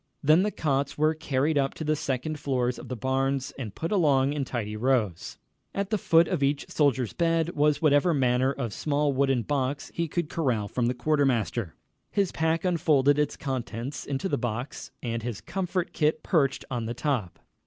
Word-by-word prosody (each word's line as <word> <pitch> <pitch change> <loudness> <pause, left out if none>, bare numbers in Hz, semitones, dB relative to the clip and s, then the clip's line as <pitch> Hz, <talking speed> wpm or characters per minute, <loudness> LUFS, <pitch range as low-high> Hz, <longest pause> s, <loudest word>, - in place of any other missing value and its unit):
Then 155 +5 +6
the 210 - +1
cots 140 -7 -1
were 155 +1 +3
carried 150 -1 0
up 135 -1 0
to - - -5
the 155 0 +1
second 145 +2 -3
floors 125 -4 -1
of - - -9
the 125 - -3
barns 135 +2 -1
and 115 -7 -6
put 165 - -3
along 145 -8 +3
in 145 -2 -1
tidy 110 -5 -4
rows. 110 -7 0 0.4
At 200 +1 -2
the 215 - +2
foot 165 -1 +4
of 180 -6 -1
each 140 +1 0
soldier's 135 -6 +1
bed 165 -1 +1
was 150 -2 +1
whatever 145 +3 +4
manner 130 -2 +2
of 120 -6 -4
small 145 +2 0
wooden 135 -2 +2
box 140 0 -2
he 170 0 -1
could 170 +1 -2
corral 125 -11 -1
from 120 +2 -1
the 125 - 0
quartermaster, 135 -5 +1
and 100 - -7
there 80 - -20
he - - -39
kept - - -47
all - - -48
he - - 0
owned. - - +6
His 185 - -5
pack 160 +2 0
unfolded 150 -5 +3
its 150 -1 0
contents 130 0 -4
into 140 +6 -2
the 145 - -1
box, 120 +3 -4
and 115 -1 -2
his 115 -3 -4
comfort 180 -1 -3
kit 155 0 +1
perched 140 -6 +1
on 120 -3 -2
the 120 - -4
top. 125 - -2
140 Hz, 210 wpm, -27 LUFS, 125-155 Hz, 0.4 s, Then